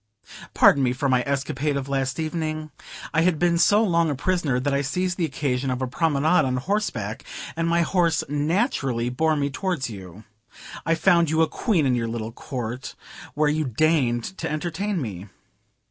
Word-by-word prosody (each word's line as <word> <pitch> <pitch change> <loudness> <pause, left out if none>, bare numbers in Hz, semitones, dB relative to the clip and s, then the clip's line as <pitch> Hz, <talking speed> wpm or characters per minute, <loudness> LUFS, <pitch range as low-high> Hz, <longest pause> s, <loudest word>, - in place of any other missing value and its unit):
Pardon 140 - +6
me 125 -2 +2
for 135 +2 -1
my 130 -2 +3
escapade 140 +1 -1
of 135 -1 -4
last 135 +1 -1
evening. 155 -1 -3 0.4
I 160 - +3
had 175 -1 +2
been 170 +1 +2
so 210 +5 +5
long 170 -5 +2
a 145 - -1
prisoner, 150 -3 0
that 140 +2 -1
I 140 - +2
seized 180 +6 -1
the 175 - 0
occasion 135 -2 -2
of 130 -1 -1
a 130 - -1
promenade 155 +5 +2
on 130 -2 0
horseback, 125 - -2 0.3
and 165 0 -1
my 170 0 +3
horse 170 -1 +1
naturally 145 - 0
bore 155 +5 +1
me 140 -1 -1
towards 150 - -2
you. 95 0 -10 0.6
I 165 - +3
found 170 -1 +3
you 160 +1 +3
a - - +2
Queen 185 - 0
in 130 - +2
your 115 -2 0
little 115 -1 -4
court, 125 0 -6 0.4
where 150 +1 +2
you 155 +1 +1
deigned 130 -2 +1 0.2
to - - -2
entertain 175 +6 -2
me. 100 -4 -6
145 Hz, 180 wpm, -24 LUFS, 130-165 Hz, 0.6 s, Pardon